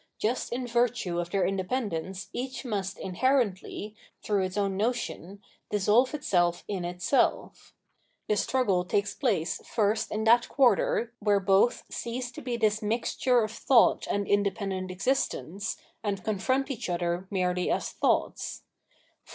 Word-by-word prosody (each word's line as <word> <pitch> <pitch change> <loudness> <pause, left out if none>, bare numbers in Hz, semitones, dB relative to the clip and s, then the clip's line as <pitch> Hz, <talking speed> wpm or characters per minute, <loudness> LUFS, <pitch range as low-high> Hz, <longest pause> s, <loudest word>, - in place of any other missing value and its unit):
Just 235 +4 -1
in 250 +1 -2
virtue 235 -7 0
of 175 0 -3
their 195 +1 +1
independence 190 -2 -2
each 260 +1 -4
must 200 -4 -3
inherently, 210 -1 -1 0.3
through 200 -3 +1
its 185 +2 -5
own 200 -1 0
notion, 205 -3 -3 0.3
dissolve 210 +7 +3
itself 175 -10 +1
in 195 -3 -3
itself. 180 - 0 0.5
The 210 - +2
struggle 205 -5 +1
takes 200 +3 0
place 200 - 0
first 215 0 0
in 215 +1 -1
that 235 +2 +4
quarter 240 -3 +2
where 205 -1 +3
both 195 +4 +3
cease 245 +1 -4
to - - -9
be 245 -1 -3
this 215 -2 +1
mixture 235 +2 +1
of 215 - -3
thought 235 +1 +3
and 200 0 -1
independent 195 -2 0
existence, 195 - -1 0.3
and 200 -3 -2
confront 260 +7 0
each 240 -6 -4
other 175 +1 -1
merely 180 -2 0
as - - -1
thoughts. - - -1
205 Hz, 135 wpm, -28 LUFS, 190-240 Hz, 0.5 s, that